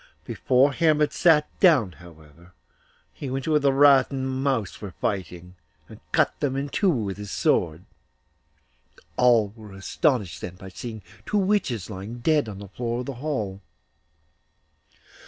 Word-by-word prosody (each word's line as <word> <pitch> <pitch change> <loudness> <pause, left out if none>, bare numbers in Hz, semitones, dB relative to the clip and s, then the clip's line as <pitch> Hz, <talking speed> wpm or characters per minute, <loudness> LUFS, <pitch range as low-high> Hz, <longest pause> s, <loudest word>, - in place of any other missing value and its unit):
Before 135 +2 +2
Hermod 150 -1 +2
sat 155 -3 +4
down, 145 - +5
however, 85 0 -17 0.6
he 140 - -6
went 135 +1 -3
to 160 - -1
where 150 - +4
the 140 -1 +3
rat 135 -1 +5
and 135 -1 -3
the - - -2
mouse 130 -6 -2
were 100 -4 -8
fighting, 90 -2 -4 0.3
and - - -13
cut - - +1
them 135 -2 -1
in 140 +1 -3
two 195 +7 +1
with 105 - -1
his 105 -1 -7
sword. 85 -2 0 1.3
All 120 -4 +4
were 105 -1 -13
astonished 95 - -1
then 90 - -6
by 95 +1 -11
seeing 110 +2 -8 0.2
two 210 - 0
witches 185 - 0
lying 100 +5 -7
dead 145 -1 +1
on 100 - -8
the 100 0 -9
floor 120 +3 -3
of - - -7
the 140 - -5
hall. 110 -11 -3
120 Hz, 155 wpm, -24 LUFS, 95-140 Hz, 1.3 s, down